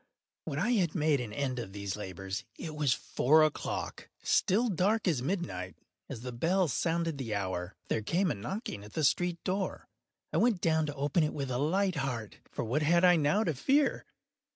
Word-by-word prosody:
When 140 - -3
I 215 +11 +1
had 185 -9 +2
made 150 -3 +2
an 115 -4 -5
end 130 +2 -2
of 95 -5 -6
these 100 -2 -3
labors, 95 0 -5
it 160 - -6
was 150 -3 +1
four 150 +6 +3
o’clock—still 190 +7 0
dark 200 +4 +1
as 155 -8 +2
midnight. 130 - -3 0.3
As 115 - -6
the 125 0 -5
bell 175 +9 +2
sounded 165 +2 0
the 115 -5 -2
hour, 95 -2 -3
there 110 - 0
came 175 - +1
a - - +1
knocking 115 - -5
at 105 - -12
the 155 - -1
street 175 +4 +2
door. 190 +1 -2 0.5
I - - +2
went 230 -5 +3
down 160 -2 +2
to 145 - -4
open 145 +4 +1
it 150 - -1
with 135 -3 -3
a 125 - -1
light 185 +4 +1
heart,—for 125 -6 -4
what 125 +7 0
had 170 +4 +4
I 180 -1 +7
now 165 +7 +2
to 165 - 0
fear? 275 - +1
150 Hz, 190 wpm, -31 LUFS, 120-175 Hz, 0.5 s, I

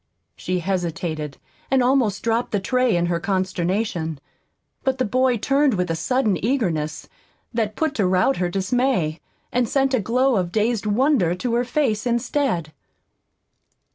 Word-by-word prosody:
She 180 -1 -2
hesitated, 165 -5 -3 0.3
and 265 -1 +3
almost 245 -6 +2
dropped 230 +1 0
the 205 - +2
tray 250 +2 +1
in 175 0 +1
her 175 -1 0
consternation. 185 -3 -1 0.6
But 265 -1 0
the 255 - +1
boy 255 +2 +2
turned 275 +2 +2
with 180 -2 -1
a - - 0
sudden 215 +1 0
eagerness 170 - -1 0.5
that 220 -2 -1
put 315 -3 0
to 190 - +3
rout 185 +9 +2
her 180 -1 0
dismay, 190 -4 0 0.3
and 245 -2 +1
sent 270 -1 +1
a 255 - +3
glow 250 +4 +2
of 180 -2 -1
dazed 220 +1 0
wonder 210 - +2
to 230 +6 -2
her 240 +1 +1
face 250 -4 0
instead. 235 - 0
215 Hz, 150 wpm, -22 LUFS, 180-255 Hz, 0.6 s, and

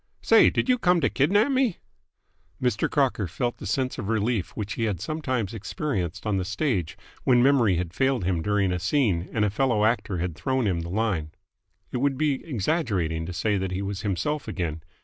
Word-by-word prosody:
"Say, - - +6
did - - -1
you 250 -1 +3
come 180 -4 +3
to 135 - +1
kidnap 205 - +3
me?" 260 -8 +1 0.8
Mr. 125 -5 0
Crocker 130 -8 +1
felt 120 +8 -2
the - - -7
sense 130 -1 -1
of 105 -2 -4
relief 110 -3 0
which 105 -1 -3
he 115 - -1
had 100 -6 -1
sometimes 130 - -2
experienced 100 - -3
on 105 -2 +1
the 95 - 0
stage 100 - -1 0.3
when 125 -2 +4
memory 125 -8 +4
had 85 0 -3
failed 130 -3 +1
him 90 -2 0
during 100 0 +1
a 90 - -1
scene 95 - +1
and 105 -2 +1
a 105 - 0
fellow 110 -2 +2
actor 110 -4 0
had 85 -1 -3
thrown 130 - 0
him 90 -4 +1
the 85 0 -5
line. 95 -6 -1 0.6
It - - -2
would 135 +1 +1
be 145 -2 0
exaggerating 100 - -1
to - - -4
say 105 +3 0
that 95 0 -2
he 95 +2 -3
was 100 -1 -4
himself 115 +10 -2
again. 85 -7 -3
110 Hz, 200 wpm, -25 LUFS, 95-135 Hz, 0.8 s, Say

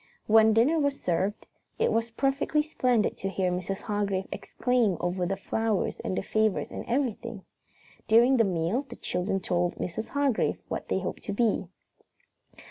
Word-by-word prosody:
When 220 0 +6
dinner 265 +9 +4
was 285 -1 0
served, 185 +4 -1 0.3
it - - +2
was 230 +1 0
perfectly 275 +5 +1
splendid 250 -7 +1
to 195 - -3
hear 185 -1 0
Mrs. 185 +2 -3
Hargrave 200 -2 -1
exclaim 240 -8 0
over 180 0 -1
the 195 +1 -2
flowers 220 +1 -1
and 185 - -3
the - - -1
favors 215 0 0
and - - -5
everything. 235 -5 -2 0.6
During 240 +4 +5
the 230 - +5
meal 180 +4 0
the 240 - -8
children 195 +2 -2
told 175 -1 0
Mrs. 200 +5 -4
Hargrave 285 -5 +1
what - - -4
they - - 0
hoped - - -4
to 205 - -2
be. 215 -3 +1
215 Hz, 160 wpm, -28 LUFS, 190-245 Hz, 0.6 s, When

